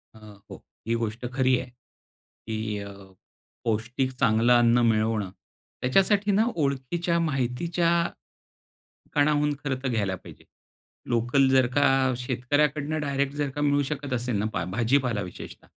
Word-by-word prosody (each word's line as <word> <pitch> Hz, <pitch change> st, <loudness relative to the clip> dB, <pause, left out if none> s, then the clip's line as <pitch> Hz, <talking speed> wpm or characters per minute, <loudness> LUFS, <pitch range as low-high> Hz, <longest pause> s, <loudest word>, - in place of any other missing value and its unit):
अ, 110 Hz, -, -14 dB, 0.3 s
हो. -, -, -11 dB, 0.2 s
ही 115 Hz, -, +1 dB
गोष्ट 115 Hz, +1 st, -3 dB
खरी 130 Hz, -1 st, +3 dB
आहे 125 Hz, -, -7 dB, 0.8 s
की 110 Hz, -1 st, -3 dB
अ, 100 Hz, 0 st, -7 dB, 0.7 s
पौष्टिक 115 Hz, +4 st, -1 dB
चांगलं 115 Hz, 0 st, +4 dB
अन्न 120 Hz, 0 st, +4 dB
मिळवणं, 110 Hz, -3 st, +1 dB, 0.5 s
त्याच्यासाठी 195 Hz, -, +3 dB
ना 215 Hz, +3 st, +3 dB
ओळखीच्या 160 Hz, +4 st, -1 dB
माहितीच्या 165 Hz, +4 st, 0 dB, 1.3 s
कणाहून 150 Hz, 0 st, +2 dB
खर्च 135 Hz, -1 st, -2 dB
घ्यायला 105 Hz, -6 st, 0 dB
पाहिजे. -, -, -14 dB, 0.6 s
लोकल 120 Hz, +3 st, +2 dB
जर 130 Hz, -1 st, +4 dB
का 135 Hz, -2 st, +3 dB
शेतकऱ्याकडून 145 Hz, +5 st, 0 dB
डायरेक्ट 140 Hz, -1 st, -1 dB
जर 145 Hz, -1 st, -1 dB
का 145 Hz, +2 st, -6 dB
मिळू 145 Hz, 0 st, +3 dB
शकत 145 Hz, -2 st, -4 dB
असेल 120 Hz, -2 st, -1 dB
ना 105 Hz, -, -1 dB
पहा 85 Hz, -, -1 dB
भाजीपाला 120 Hz, 0 st, +1 dB
विशेषतः 90 Hz, -, -10 dB
130 Hz, 130 wpm, -26 LUFS, 115-145 Hz, 1.3 s, चांगलं